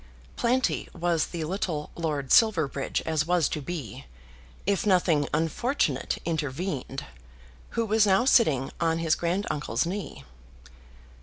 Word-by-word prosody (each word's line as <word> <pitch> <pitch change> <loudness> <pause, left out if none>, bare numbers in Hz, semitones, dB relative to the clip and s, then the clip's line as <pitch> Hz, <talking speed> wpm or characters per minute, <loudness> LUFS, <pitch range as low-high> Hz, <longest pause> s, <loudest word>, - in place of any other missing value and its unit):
Planty 250 +2 0
was 170 -2 +1
the 170 -2 -4
little 160 -3 -3
Lord 150 -5 -2
Silverbridge 160 - +3
as 155 -1 0
was 175 -3 +3
to 150 - -3
be, 135 - -6 0.6
if 200 0 +1
nothing 175 -7 +2
unfortunate 160 - 0
intervened, 150 -3 -3 0.7
who 230 - +2
was 215 0 +3
now 195 +5 +4
sitting 150 - +3
on 165 -1 +2
his 165 -1 +1
granduncle's 170 - -1
knee. 185 -2 -5
165 Hz, 120 wpm, -27 LUFS, 150-190 Hz, 0.7 s, now